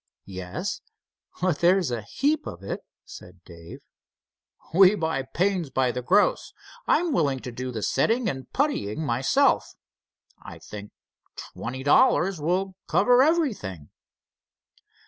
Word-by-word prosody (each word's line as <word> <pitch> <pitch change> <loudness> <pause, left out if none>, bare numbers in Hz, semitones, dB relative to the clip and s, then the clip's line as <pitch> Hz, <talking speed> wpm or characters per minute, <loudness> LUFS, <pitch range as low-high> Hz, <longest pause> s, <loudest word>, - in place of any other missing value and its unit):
"Yes, 90 -2 -5 0.6
but 180 -5 +1
there's 175 -4 +3
a 120 -2 -2
heap 285 - -1
of 85 - -8
it," 100 - -4 0.3
said 90 0 -13
Dave. 85 -1 -12 0.9
"We 190 +3 +6
buy 160 -7 -1
the 130 - -12
panes 185 -4 0
by 130 -1 +1
the 125 +1 -4
gross. 195 +11 +2 0.3
I'm 335 -1 +2
willing 140 - +1
to 125 - -7
do 125 +2 -5
the 110 -3 -5
setting 230 +1 +1
and 130 -8 -5
puttying 160 - -1
myself. 125 0 +1 0.7
I - - -10
think 105 -1 -10 0.5
twenty 130 +3 -7
dollars 180 - +3
will 185 +5 -1
cover 245 0 +4
everything." 225 - 0
145 Hz, 125 wpm, -25 LUFS, 115-195 Hz, 0.9 s, We